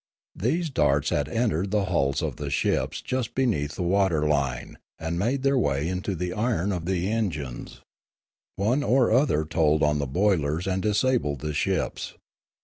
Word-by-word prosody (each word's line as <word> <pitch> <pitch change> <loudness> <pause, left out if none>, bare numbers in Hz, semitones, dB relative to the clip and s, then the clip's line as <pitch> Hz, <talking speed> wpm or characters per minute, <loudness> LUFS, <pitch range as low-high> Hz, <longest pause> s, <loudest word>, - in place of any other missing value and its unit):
These 155 - -1
darts 75 - +2
had - - 0
entered 105 -6 0
the 105 -1 +1
hulls 70 -7 0
of - - -3
the 75 -2 -4
ships 70 - -1
just 130 -3 -3
be 135 - +2
neath 75 - -1
the 90 - -3
water 90 -4 +2
line 70 -5 -1 0.2
and 80 +1 -3
made 130 +7 0
their 135 -1 +3
way 70 - 0
into 95 +2 -2
the 90 +1 -3
iron 105 -3 0
of 90 -3 -3
the 90 0 -1
engines; 80 - -3 0.7
one 115 +9 +1
or 130 -4 +3
other 115 - +3
told 80 -1 +2
on 75 0 +2
the 70 - -1
boilers 85 -1 +1
and 95 0 -1
disabled 105 - +1
the 75 0 -3
ships. - - -2
90 Hz, 170 wpm, -26 LUFS, 75-110 Hz, 0.7 s, their